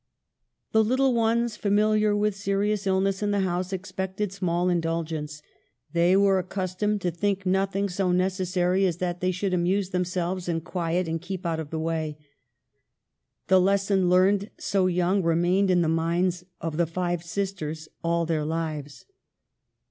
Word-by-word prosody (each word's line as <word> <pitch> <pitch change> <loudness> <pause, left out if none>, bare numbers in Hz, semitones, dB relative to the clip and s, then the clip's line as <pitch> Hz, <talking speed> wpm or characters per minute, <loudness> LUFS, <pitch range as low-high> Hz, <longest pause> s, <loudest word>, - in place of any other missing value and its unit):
The 220 0 +4
little 260 +3 +2
ones, 230 0 +1
familiar 210 +1 +2
with 210 -1 +1
serious 200 +1 -1
illness 190 +1 +1
in 205 - 0
the 205 -1 +1
house, 180 0 -1
expected 190 +1 -3
small 180 -2 0
indulgence. 165 -3 -2 0.5
They 175 +2 +4
were 195 -1 +4
accustomed 190 +3 -2
to 180 - 0
think 195 +3 -1
nothing 195 +1 +1
so 185 0 0
necessary 185 0 +1
as 170 -3 -2
that 175 0 -3
they 185 - +1
should 185 +1 -1
amuse 185 +2 +1
themselves 180 0 -2
in 165 -1 -1
quiet, 175 +1 -2
and 165 0 -2
keep 185 0 -6
out 165 -1 -1
of 155 -2 -5
the 160 - -4
way. 160 -2 -2 1.3
The 190 -1 +5
lesson 195 -1 +2
learned 190 +3 +3
so 190 -2 +1
young 180 +2 +1
remained 175 +3 +2
in 175 -1 +4
the - - 0
minds 170 +2 0
of 160 -2 -4
the 170 -1 +2
five 175 0 -2
sis 195 +3 -2
ters 155 -3 -6 0.2
all 170 0 +1
their 160 -2 0
lives. 155 -2 -4
185 Hz, 155 wpm, -26 LUFS, 170-195 Hz, 1.3 s, The